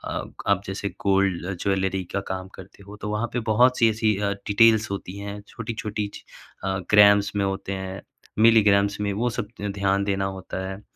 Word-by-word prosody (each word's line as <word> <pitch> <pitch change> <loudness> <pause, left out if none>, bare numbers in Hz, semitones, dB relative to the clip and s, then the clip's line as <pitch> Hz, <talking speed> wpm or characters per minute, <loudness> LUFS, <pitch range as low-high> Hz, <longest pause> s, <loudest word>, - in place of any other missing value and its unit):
अब - - -5
आप 100 -1 +3
जैसे 100 +1 -4
गोल्ड 95 -3 +1
ज्वेलरी 95 -1 0
का 100 - +1
काम 95 0 -4
करते 95 +1 -13
हो 105 - -9
तो 105 - -4
वहाँ 105 +3 -1
पे 125 - 0
बहुत-सी 115 +1 +4
ऐसी 110 -1 +1
अ, 100 0 0 0.2
डिटेल्स 110 +1 +4
होती 100 -1 -5
हैं 100 0 -6
छोटी-छोटी 110 -2 -4
च - - -11 0.4
अ, 95 0 -1
ग्राम्स 100 -1 +6
में 100 -1 +1
होते 95 0 -3
हैं 95 0 -6 0.4
मिलीग्राम्स 100 -3 +4
में 100 -1 0
वो 120 +5 0
सब 110 -2 -4
त 105 - -2
ध्यान 100 0 +1
देना 100 -1 -1
होता 95 0 -5
है। 95 +1 -7
100 Hz, 185 wpm, -24 LUFS, 95-105 Hz, 0.4 s, ग्राम्स